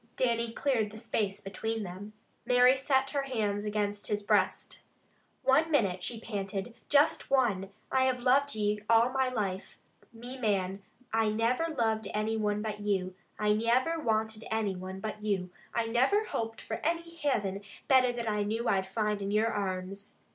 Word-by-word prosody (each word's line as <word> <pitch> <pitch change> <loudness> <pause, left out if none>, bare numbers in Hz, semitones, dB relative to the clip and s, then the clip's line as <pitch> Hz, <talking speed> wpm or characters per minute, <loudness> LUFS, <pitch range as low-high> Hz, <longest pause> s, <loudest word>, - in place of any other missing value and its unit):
Dannie 235 -2 +1
cleared 230 -4 0
the 215 - -11
space 210 -3 -2
between 220 +2 -3
them. 195 +3 -8 0.3
Mary 250 +1 +5
set 270 0 +1
her 285 - 0
hands 215 -6 -1
against 205 -1 -2
his 210 0 -1
breast. - - 0 0.6
"One 300 +5 +4
minute," 200 - +1
she 235 -2 -3
panted. 200 0 -4 0.2
"Just 290 0 +3
one! 225 -8 +2 0.2
I 260 0 +3
have 255 -1 +1
loved 270 +2 +3
you 210 0 0
all 230 +1 +5
me 265 -1 +2
life, 200 -6 -3 0.3
me 245 +3 -9
man. 195 -4 0 0.3
I 225 -1 +3
niver 250 +9 0
loved 220 -2 +1
any 215 +1 0
one 210 -1 0
but 210 -1 -4
you. 195 -3 -1 0.2
I 210 0 +2
niver 245 +9 +2
wanted 220 -4 -1
any 220 -3 0
one 185 +1 -7
but 215 0 -5
you. 195 -4 -1 0.2
I 230 - 0
niver 260 - +3
hoped 225 - -4
for - - -4
any 335 +2 +1
Hivin 270 - -2 0.2
better 255 -2 +5
than 235 -1 -4
I 210 -1 0
knew 220 +3 -1
I'd 190 -1 +1
find 210 +1 -1
in 195 - -2
your 215 +2 +2
arms. 195 0 -4
220 Hz, 170 wpm, -30 LUFS, 205-250 Hz, 0.6 s, Mary